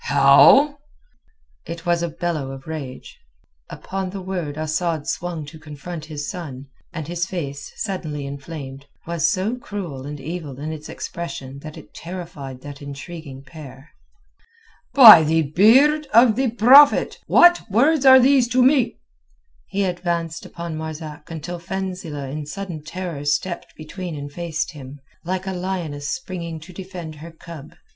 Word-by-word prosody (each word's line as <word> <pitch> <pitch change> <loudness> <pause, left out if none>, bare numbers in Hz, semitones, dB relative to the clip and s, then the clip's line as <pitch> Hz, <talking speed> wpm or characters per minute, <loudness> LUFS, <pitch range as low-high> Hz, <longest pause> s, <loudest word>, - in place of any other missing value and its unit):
"How?" 145 - +6 0.9
It 170 +1 -7
was 175 -1 +1
a 170 - -1
bellow 160 -4 -3
of 135 0 -9
rage. 150 -5 -8 0.5
Upon 190 -1 -5
the 195 +1 -6
word 180 -6 -4
Asad 155 0 -2
swung 170 -3 -3
to 150 +2 -12
confront 155 +2 -8
his 150 -2 -6
son, 140 -7 -7 0.3
and 160 -4 -6
his 175 +1 -2
face, 145 -6 -5
suddenly 155 -8 -4
inflamed, 140 -1 -8 0.2
was 170 -3 +1
so 205 +6 -1
cruel 170 - -6
and 145 0 -7
evil 150 -2 -6
in 155 +2 -4
its 155 -1 -9
expression 165 -6 -7
that 155 +1 -10
it - - -14
terrified 165 -7 -8
that 145 0 -10
intriguing 140 -1 -9
pair. 140 0 -12 1.0
"By 225 - +11
the 160 +1 +2
beard 260 - +4
of 230 -2 +7
the 260 +1 +1
Prophet! 255 +6 +6
what 350 -6 +5
words 275 +8 +3
are 260 -1 +9
these 260 -1 +4
to 250 +1 +3
me?" 260 -1 +3 0.7
He 200 +1 -1
advanced 170 -2 -3
upon 170 -2 -6
Marzak 155 -1 -7
until 170 +2 -6
Fenzileh 180 -5 -5
in 150 0 -5
sudden 175 -2 -6
terror 165 -2 -6
stepped 145 +5 -2
between 170 +2 -7
and 145 0 -7
faced 170 +1 -3
him, 140 -2 -11 0.2
like 185 +2 -3
a 190 - -3
lioness 175 -6 -4
springing 170 - -5
to 180 +4 -12
defend 180 -3 -8
her 160 +3 -10
cub. 160 -2 -11
165 Hz, 150 wpm, -22 LUFS, 145-185 Hz, 1.0 s, By